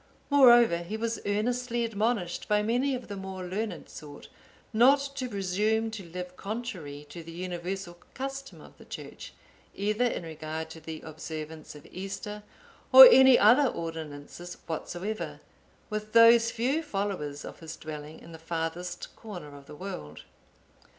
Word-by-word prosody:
Moreover, 240 -9 +7
he 175 +6 -5
was 230 0 -2
earnestly 235 +3 0
admonished 215 -4 -1
by 210 0 +2
many 250 +5 +1
of 250 - -7
the 205 - -6
more 190 -1 -6
learned 185 -1 -4
sort, 145 -1 -11 0.4
not 250 +6 +6 0.2
to 255 -2 -4
presume 210 +3 0
to 220 -3 -7
live 180 +1 -7
contrary 190 - -6
to 170 - -8
the 165 0 -10
universal 175 +1 -5 0.2
custom 270 +1 -6
of - - -16
the - - -14
Church, - - -9 0.4
either 210 +4 0
in 235 - -1
regard 160 0 -6
to 160 - -9
the 160 0 -7
observance 155 0 -8
of 150 - -13
Easter, 200 +3 -6 0.5
or - - +13
any 265 - +8
other 250 +7 +6
ordinances 165 - -6
whatsoever, 180 +6 -4 0.5
with 215 0 -4
those 230 0 +7
few 255 +8 0
followers 195 - -3
of - - -9
his 160 -1 -8
dwelling 155 0 -8
in 165 - -13
the 160 - -10
farthest 165 +2 -4
corner 180 -10 -9
of 140 0 -14
the 150 - -10
world. 80 - -7
195 Hz, 150 wpm, -28 LUFS, 165-230 Hz, 0.5 s, or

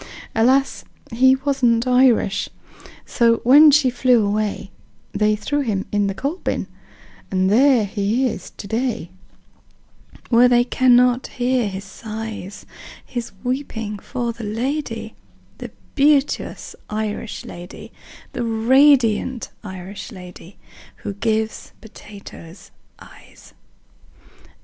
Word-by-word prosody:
Alas, 260 +5 +2 0.3
he 260 +3 +4
wasn't 265 -4 +1
Irish. 250 -6 +2 0.6
So 230 -1 +2
when 290 +5 +8
she 285 -3 +4
flew 245 -3 +3
away, 205 -1 -2 0.4
They 210 +1 +1
threw 250 +8 -2
him 215 -8 -2
in 205 -1 +1
the 195 - -3
coal 280 - -3
bin - - -3 0.6
And 190 0 +1
there 250 -1 +4
he 210 +5 -1
is - - -6
to - - -11
day, 225 -6 -2 1.2
Where 245 +1 +6
they 245 -1 +4
cannot 250 0 +3
hear 245 -2 -1
his 190 0 -7
sighs 215 -1 -8 0.4
His 240 -2 -6
weeping 225 -5 -4
for 240 +2 -4
the 230 0 -10
lady, 225 +1 -3 0.5
The - - -7 0.2
beauteous 285 0 +1
Irish 215 0 -4
lady, 175 +1 -10 0.4
The 245 - -3
radiant 240 +1 +3
Irish 190 0 -8
lady 180 0 -12 0.5
Who 200 - -4
gives 220 +1 -2
potatoes 200 -5 -13 0.3
eyes." - - -17
230 Hz, 110 wpm, -20 LUFS, 205-255 Hz, 1.2 s, when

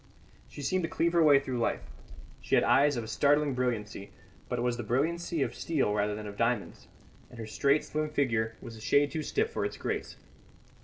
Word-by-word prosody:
She 145 - -9
seemed 185 +4 0
to 165 - -2
cleave 170 +1 0
her 170 - +4
way 145 -3 +7
through 130 -3 -4
life. 115 - -1 0.6
She - - +1
had - - +4
eyes 145 0 +4
of 115 -2 -4
startling 145 +3 +2
brilliancy, 110 -5 -3 0.4
but 125 - -2
it 120 - -1
was 120 -1 0
the - - -3
brilliancy 160 +7 0
of - - -3
steel 145 -10 0
rather 105 0 0
than 105 0 -7
of 100 -1 -8
diamonds; 115 -2 -1 0.4
and 120 - -14
her 115 - -6
straight, 140 +8 +1
slim 155 0 -2
figure 115 -7 0
was 115 - -9
a 110 - -12
shade 140 +5 +3
too 160 - -2
stiff 435 - -1
for - - -2
its - - -3
grace. - - -4
130 Hz, 210 wpm, -29 LUFS, 110-150 Hz, 0.6 s, way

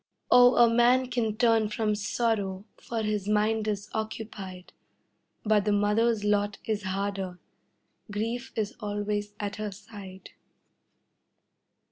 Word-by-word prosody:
Oh, 245 0 +7
a 240 - +7
man 245 +2 +3
can 225 -4 -1
turn 225 -3 +3
from 215 0 0
sorrow, 205 -2 -1
for 230 -2 -4
his 210 -2 -1
mind 215 +1 +1
is 205 -1 -2
occupied, 210 -4 -6 0.7
But 215 -2 +3
the 210 - +2
mother's 210 +2 +2
lot 205 -1 +1
is 215 -2 -1
harder 190 -1 -3 0.7
grief 230 +5 -3
is 215 -1 -2
always 205 -1 -3
at 205 -1 -4
her 210 -1 -3
side. 195 -2 -11
210 Hz, 120 wpm, -28 LUFS, 205-225 Hz, 0.7 s, Oh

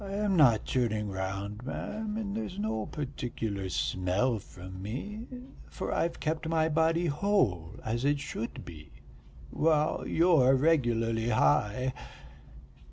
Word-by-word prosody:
"I 195 0 -6
am 205 -1 +1
not 125 -10 +5
turning 110 -5 0
round, 100 +3 -4
ma'am, 215 - -4
and 205 -2 -3
there's 215 -4 -4
no 200 - -2
particular 115 -8 -4
smell 95 +7 0
from 95 0 -10
me, 205 - -5 0.4
for - - -4
I've 170 0 -1
kept 160 0 -2
my 160 -1 +2
body 165 +2 +2
whole 145 - +1
as 115 +2 -1
it 145 +1 +2
should 115 -4 -5
be, 75 -3 -11 0.6
while 155 -1 +1
you're 160 -6 +5
regularly 120 -6 +2
high. 120 +3 +2
130 Hz, 125 wpm, -30 LUFS, 105-165 Hz, 0.6 s, not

